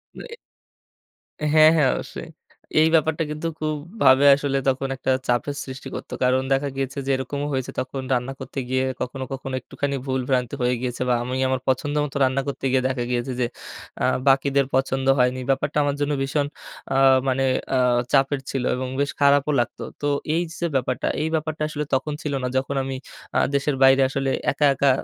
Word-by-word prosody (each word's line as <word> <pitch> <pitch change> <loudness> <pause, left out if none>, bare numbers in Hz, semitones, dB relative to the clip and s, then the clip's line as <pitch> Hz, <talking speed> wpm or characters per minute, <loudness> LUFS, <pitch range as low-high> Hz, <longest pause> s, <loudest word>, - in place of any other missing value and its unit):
Way 470 - -9 1.2
হ্যাঁ, 155 0 +8
হ্যাঁ 140 -4 +4
,অবশ্যই। - - -7 0.5
এই 160 - +5
ব্যাপারটা 160 +1 +2
কিন্তু 155 +2 -3
খুব 155 0 -1 0.3
ভাবে 130 +2 +6
আসলে 140 -1 -1
তখন 135 +1 -1
একটা 130 0 -1 0.2
চাপের 125 +4 0
সৃষ্টি 130 0 -8
করতো। - - -7
কারণ 130 +1 +3
দেখা 140 +1 0
গিয়েছে 135 0 -3
যে 135 - 0
এরকমও 140 +2 -3
হয়েছে, 130 -1 -2
তখন 130 +1 -4
রান্না 125 +2 -1
করতে 135 - -6
গিয়ে 130 0 +1 0.2
কখনো, 130 +1 -4
কখনো 135 0 -6
একটুখানি 140 -1 -3
ভুল 130 -1 -1
ভ্রান্তি 125 -1 0
হয়ে 125 0 +2
গিয়েছিল 125 0 -2
বা 120 - +4
আমি 125 +1 -3
আমার 130 -1 -1
পছন্দ 145 +3 0
মতো 140 -1 -5
রান্না 130 +1 +2
করতে 140 -1 -4
গিয়ে 130 -1 +2
দেখা 130 -2 -2
গিয়েছে 120 +1 -1
যে, 125 - +2 0.6
আ - - +4 0.2
বাকিদের 140 0 +3
পছন্দ 135 0 0
হয়নি। 125 +1 +2
ব্যাপারটা 135 +2 0
আমার 145 0 0
জন্য 145 - +1
ভীষণ 140 +1 0 0.5
আ - - +3 0.3
মানে 135 0 +1 0.3
আ - - +3 0.3
চাপের 135 0 +3
ছিল 135 -2 -2
এবং 130 0 -3
বেশ 140 0 +1
খারাপও 140 +1 +4
লাগতো। 120 - -2 0.2
তো 145 - 0 0.3
এই 170 - +2 0.2
যে, 170 - -2
ব্যাপারটা 130 -1 0
এই 155 - 0
ব্যাপারটা 155 0 -3
আসলে 150 0 -3
তখন 150 +3 -2
ছিল 150 - -3
না। - - 0
যখন 135 +1 -1
আমি 135 0 -4 0.4
আ - - +5 0.2
দেশের 140 0 +1
বাইরে 135 0 +6
আসলে 135 0 -1 0.2
একা, 145 +1 +1
একা 140 +1 +2
135 Hz, 185 wpm, -23 LUFS, 130-145 Hz, 1.2 s, হ্যাঁ